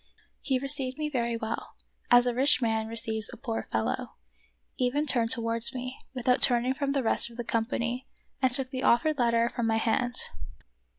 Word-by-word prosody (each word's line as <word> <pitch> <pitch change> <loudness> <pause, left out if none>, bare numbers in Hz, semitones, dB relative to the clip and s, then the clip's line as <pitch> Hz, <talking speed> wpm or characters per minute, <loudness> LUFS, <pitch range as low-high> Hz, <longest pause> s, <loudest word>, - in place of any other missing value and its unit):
He 265 -2 0
received 270 -1 -1
me 305 -1 -2
very 235 -3 -1
well, 225 0 -5 0.2
— - - -43
as 245 0 +6
a 245 - 0
rich 260 +1 +3
man 220 -2 0
receives 220 -1 -3
a - - -10
poor 230 -2 -4
fellow, 110 -9 -2 0.3
— - - -44
even 255 +4 +1
turned 240 -5 +2
towards 230 +1 +1
me, 255 +1 -6 0.2
without 250 0 +1
turning 245 +1 +3
from 275 0 -2
the 275 -2 0
rest 230 - +3
of 235 - -14
the 240 - -3
company, 235 +2 -2 0.3
and 260 -1 +3
took 255 0 +4
the 255 - -3
offered 285 +6 +2
letter 235 -1 +2
from 235 -2 -1
my 225 0 +2
hand. 245 +2 0
245 Hz, 190 wpm, -28 LUFS, 230-260 Hz, 0.3 s, as